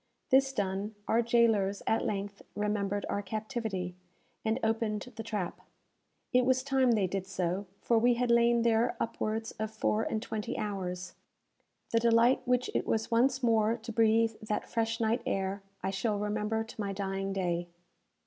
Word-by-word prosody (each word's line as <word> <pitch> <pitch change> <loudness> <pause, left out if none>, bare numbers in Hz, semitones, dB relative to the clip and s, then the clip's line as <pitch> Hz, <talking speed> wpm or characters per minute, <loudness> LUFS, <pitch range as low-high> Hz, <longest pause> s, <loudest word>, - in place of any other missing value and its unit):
This 270 +1 +5
done, 200 -1 -2
our 230 - +3
jailers 225 -4 +2
at 225 - +1
length 200 -1 -3
remembered 205 -1 -1
our 200 - -1
captivity, 215 -3 -3 0.5
and 220 +3 0
opened 225 +1 -1
the 225 - -5
trap. 210 -5 -4 0.7
It 250 0 +5
was 260 +1 +2
time 265 -3 +3
they 210 -4 +2
did 190 +1 -3
so; 185 0 -2
for 230 -1 +3
we 240 +1 +4
had 245 0 +1
lain 235 0 +4
there 230 +1 +2
upwards 225 -1 -2
of 220 0 -1
four 220 0 0
and 220 - -1
twenty 225 +2 -4
hours! 185 -3 -4 0.8
The 230 - +4
delight 235 +2 +4
which 250 0 +2
it - - -1
was 220 +1 0
once 255 +3 +3
more 225 -1 +3
to 230 0 -7
breathe 225 0 +3
that 215 -1 -2
fresh 230 0 -1
night 230 +2 +1
air, 195 +1 -1 0.2
I 190 - 0
shall 210 +2 0
remember 210 +2 -1
to 225 -1 -8
my 200 -1 -2
dying 195 0 -2
day. 175 -3 -1
220 Hz, 165 wpm, -31 LUFS, 200-235 Hz, 0.8 s, This